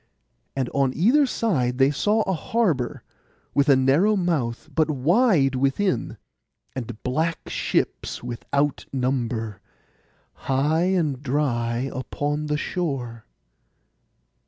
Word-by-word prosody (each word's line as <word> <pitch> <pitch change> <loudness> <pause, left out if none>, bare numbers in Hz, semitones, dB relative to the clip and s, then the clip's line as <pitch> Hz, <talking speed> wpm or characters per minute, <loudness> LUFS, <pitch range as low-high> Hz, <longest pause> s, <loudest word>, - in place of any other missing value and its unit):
And 135 -2 0
on 135 -2 +1
either 265 - +4
side 130 - 0
they 135 +1 +4
saw 210 +9 +1
a 190 - -1
harbour, 170 - -1 0.5
with 140 +1 +2
a 140 - +7
narrow 140 +11 +3
mouth, 155 - -1
but 155 -1 +2
wide 155 - +3
within; 135 +9 0 0.6
and 120 -4 -6
black 160 +6 -1
ships - - -2
without 140 +4 -2
number, 120 -5 -2 0.9
high 150 +6 +2
and 165 -8 0
dry 130 -3 -1
upon 145 +3 -3
the 150 0 0
shore. 135 -10 -3
140 Hz, 110 wpm, -24 LUFS, 130-170 Hz, 0.9 s, a